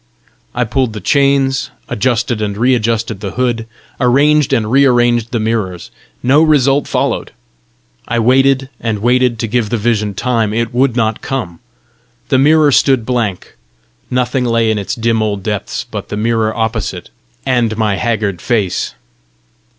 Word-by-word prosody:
I 125 - +1
pulled 125 0 -1
the 105 - -5
chains; 140 0 +1 0.2
adjusted 120 -1 -1
and 100 -1 -2
re 125 +4 +3
adjusted 115 -2 -1
the 100 -2 -5
hood; 120 -3 -1 0.3
arranged 140 +3 +3
and 110 -1 0
re 135 +2 +5
arranged 120 -3 +2
the 120 - -2
mirrors; 110 -6 -2 0.3
no 135 +5 +4
result 145 -3 +3
followed. - - -1 0.7
I 120 - -1
waited 135 +3 +3
and 115 -2 -2
waited 125 0 +2
to 115 - -2
give 115 -1 0
the 120 - 0
vision 105 -2 -1
time; 115 -3 0
it 115 +1 -1
would 125 0 +2
not 110 -3 0
come; 110 -11 -4 0.7
the 130 - +3
mirror 150 +1 +4
stood 130 -3 +3
blank; 115 -7 -2 0.5
nothing 125 +1 0
lay 115 -2 +1
in 105 - -1
its 100 - -4
dim 115 -1 0
old 100 -3 -2
depth 105 -1 -3
but 100 -2 -6
the 105 - -4
mirror 110 0 0
opposite 110 -2 -3 0.3
and 120 -4 +1
my 105 -3 0
haggard 105 -6 -1
face. 105 -6 -1
115 Hz, 155 wpm, -15 LUFS, 110-130 Hz, 0.7 s, re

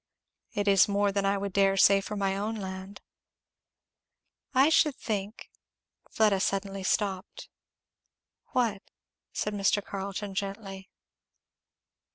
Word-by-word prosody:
"It 205 0 -2
is 195 -1 +6
more 200 0 +1
than 195 0 0
I 200 0 +2
would 200 -1 -4
dare 195 0 +3
say 195 0 +6
for 210 +2 -6
my 195 -1 0
own 210 +3 -2
land." 190 -1 -7 1.5
"I 270 +2 +5
should 305 -3 +3
think 210 0 -5 0.3
" - - -35
Fleda 210 -3 +3
suddenly 195 0 -1
stopped. 190 0 -2 1.0
"What? 225 -6 0 0.3
" - - -63
said 210 - -2
Mr. 205 0 +1
Carleton 200 +1 -5
gently. 195 -1 -5
200 Hz, 125 wpm, -28 LUFS, 195-210 Hz, 1.5 s, is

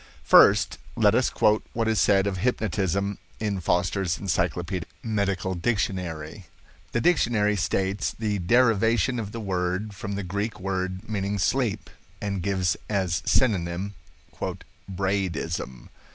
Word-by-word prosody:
First - - +6 0.2
let - - +4
us - - +3
quote 105 0 +2
what 115 -1 0
is 110 -3 +2
said 95 -1 +4
of 100 -2 -1
hypnotism 100 -3 -1 0.2
in 105 -3 -1
Foster's 90 +1 0
Encyclopedic 90 -1 -2
Medical 100 -4 -1
Dictionary. 90 -3 -2 0.4
The 120 - 0
dictionary 115 -11 +3
states 95 +1 -1
the 105 -2 -1
derivation 115 +3 +3
of 105 -2 -5
the 115 - -6
word 95 +1 -2
from 100 0 -5
the 100 - -3
Greek 100 +4 -3
word 95 0 -3
meaning 100 -1 -2
sleep, 105 -2 0 0.3
and 100 -2 -3
gives 95 -1 +1
as 95 -6 0
synonym 95 -4 +1 1.0
"Braidism". 90 -9 -2
100 Hz, 125 wpm, -26 LUFS, 90-105 Hz, 1.0 s, First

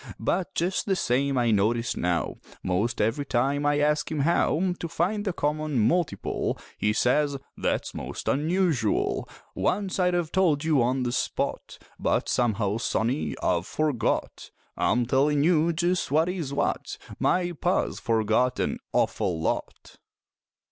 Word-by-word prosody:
But 185 0 -1
just 180 +5 0
the 195 - +2
same 135 -3 +1
I 120 -2 +2
notice 115 +3 +1
now 90 -1 -1 0.3
Most 100 +5 0
every 115 +7 +1
time 140 +2 0
I 145 0 +2
ask 150 0 +1
him 155 -2 0
how 170 +3 +2
To 170 - -3
find 185 +6 -1
the 195 - +1
common 150 -2 -1
multiple, 165 +10 0 0.2
He 105 - +1
says, 140 +5 +2 0.2
"That's - - -2
most - - -6
unusual! 155 - +1 0.2
Once 195 0 -1
I'd 180 -1 +2
have 170 -2 -1
told 165 -6 +2
you 155 -5 +3
on 125 +2 +1
the 120 - -1
spot, 125 - -2 0.2
But - - 0
somehow, 110 -3 +1
sonny, 120 +4 -1
I've 85 0 +1
forgot." 150 -7 -1 0.3
I'm 120 +2 +1
tellin' 140 +4 +2
you 165 0 +3
just 175 +2 0
what 160 +5 +2
is 170 -7 -3
what, 140 - -2 0.2
My 175 -1 +1
Pa's 175 +3 -1
forgot 115 +2 +1
an - - -1
awful 95 -6 0
lot! 80 - -3
145 Hz, 145 wpm, -26 LUFS, 120-170 Hz, 0.3 s, you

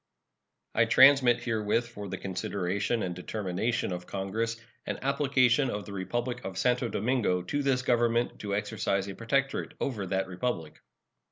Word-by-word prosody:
I - - +4
transmit 130 -3 +6
herewith, 115 0 0
for 105 -4 -7
the 95 - -4
consideration 100 +4 -2
and 90 - -2
determination 100 +4 -2
of 90 0 -5
Congress, 110 +4 -2 0.3
an - - -2
application 135 -1 +3
of 105 -2 -4
the 100 - -8
Republic 120 +6 -3
of 95 -2 -6
Santo 125 +1 +2
Domingo 110 -6 0
to 145 +10 -1
this 135 -3 +1
Government 120 -1 +1
to 100 -1 -2
exercise 100 -2 -1
a 100 - -5
protectorate 135 +6 -1
over 105 -8 -2
that 95 +1 0
Republic. 90 -4 -3
115 Hz, 150 wpm, -29 LUFS, 95-125 Hz, 0.3 s, transmit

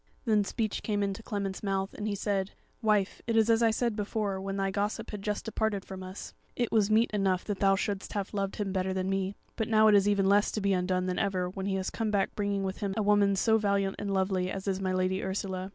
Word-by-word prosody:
Then 215 -3 +3
speech 215 +1 -2
came 205 -2 0
into 195 +2 -2
Clement's 200 -3 -3
mouth, 195 -1 -1
and 210 - -4
he 205 - -1
said: 195 -1 -1 0.3
"Wife, 210 -3 +1
it 230 -1 +1
is 225 +1 +4
as 225 0 +3
I 230 - +5
said 225 0 0
before, 205 -2 -2
when 195 0 -3
thy 195 0 0
gossip 210 +3 -2
had 210 -2 -5
just 210 0 -3
departed 220 -3 -1
from 190 -1 -8
us. 185 +1 -8 0.2
It 240 -2 -1
was 215 -2 +3
meet 220 +2 +3
enough 195 -3 +1
that 205 -2 -3
thou 195 -1 +4
shouldst 195 0 -3
have 200 0 -3
loved 195 -1 -2
him 200 -3 -2
better 190 0 -1
than 190 0 -1
me; 195 0 -1 0.2
but 220 - -1
now 220 -1 +5
it - - +5
is 200 0 +5
even 200 -1 +2
less 205 +1 +4
to - - -1
be 200 -1 +1
undone 185 0 0
than 185 -1 -1
ever, 185 -2 0
when 190 +1 -4
he 195 - 0
has 190 -1 -2
come 225 -2 -2
back 200 -2 +1
bringing 200 -1 -1
with 190 0 -3
him 195 -2 -2
a 215 - +1
woman 205 -1 +4
so 220 +3 +3
valiant 200 -2 +1
and 205 -1 -3
lovely 190 -1 +1
as 195 +1 -5
is 195 0 0
my 190 -1 0
Lady 185 +1 0
Ursula. 190 -1 -3
200 Hz, 255 wpm, -29 LUFS, 190-210 Hz, 0.3 s, I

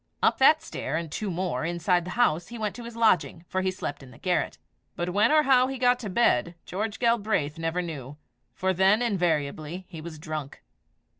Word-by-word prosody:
Up - - +3
that 305 +4 +6
stair, 135 - -4
and 165 -2 -5
two 210 +4 -3
more 175 -7 -2
inside 175 +1 +1
the - - -6
house, 175 -8 +2
he 235 - -8
went 210 -3 -2
to 240 - -8
his 235 -1 -8
lodging, 215 -6 +2
for 185 - -1
he 190 - +1
slept 145 -6 -5
in 135 - -12
the 125 - -15
garret. 180 -2 -1 0.4
But 175 +1 -2
when 210 +8 +3
or 305 0 +5
how 260 -2 +5
he 270 0 -4
got 245 0 +3
to 220 -5 -5
bed, 170 - +2
George 210 +3 -3
Galbraith 210 - +1
never 165 +2 -1
knew, 145 -4 -7 0.4
for 190 -1 0
then, 195 +5 +4
invariably, 170 -4 -1
he 165 -4 -8
was 160 -1 -8
drunk. 155 -2 -6
180 Hz, 205 wpm, -27 LUFS, 160-225 Hz, 0.4 s, that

